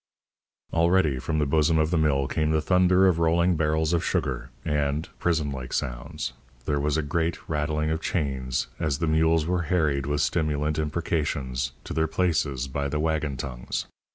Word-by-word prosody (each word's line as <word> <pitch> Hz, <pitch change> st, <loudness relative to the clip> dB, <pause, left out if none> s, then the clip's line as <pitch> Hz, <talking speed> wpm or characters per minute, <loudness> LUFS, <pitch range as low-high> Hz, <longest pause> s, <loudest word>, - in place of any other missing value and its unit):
Already 85 Hz, -4 st, +3 dB
from 80 Hz, +5 st, -2 dB
the 75 Hz, -, +2 dB
bosom 80 Hz, +3 st, +3 dB
of 80 Hz, 0 st, +2 dB
the 85 Hz, -, +2 dB
mill 70 Hz, -3 st, +2 dB
came 75 Hz, +1 st, 0 dB
the 80 Hz, 0 st, +2 dB
thunder 90 Hz, +3 st, +4 dB
of 90 Hz, -3 st, +3 dB
rolling 85 Hz, +2 st, +3 dB
barrels 80 Hz, +1 st, +1 dB
of 85 Hz, -, +1 dB
sugar, 65 Hz, -, -1 dB, 0.2 s
and 75 Hz, 0 st, 0 dB
(prison 80 Hz, -4 st, +1 dB
like 65 Hz, -2 st, -6 dB
sounds) 65 Hz, +2 st, -3 dB, 0.3 s
there 75 Hz, -1 st, 0 dB
was 75 Hz, +1 st, 0 dB
a 80 Hz, -, 0 dB
great 80 Hz, +3 st, -2 dB
rattling 75 Hz, 0 st, -1 dB
of 80 Hz, 0 st, -1 dB
chains 65 Hz, -5 st, -1 dB
as 75 Hz, -4 st, 0 dB
the 80 Hz, -, -1 dB
mules 80 Hz, 0 st, +3 dB
were 90 Hz, +1 st, 0 dB
harried 75 Hz, -6 st, +1 dB
with 75 Hz, 0 st, 0 dB
stimulant 75 Hz, -1 st, 0 dB
imprecations 75 Hz, -5 st, -1 dB
to -, -, -6 dB
their 80 Hz, 0 st, +1 dB
places 75 Hz, -6 st, 0 dB
by 70 Hz, +1 st, -2 dB
the 75 Hz, +2 st, -2 dB
waggon 75 Hz, -3 st, -1 dB
tongues. 60 Hz, -2 st, -4 dB
75 Hz, 175 wpm, -26 LUFS, 70-80 Hz, 0.3 s, thunder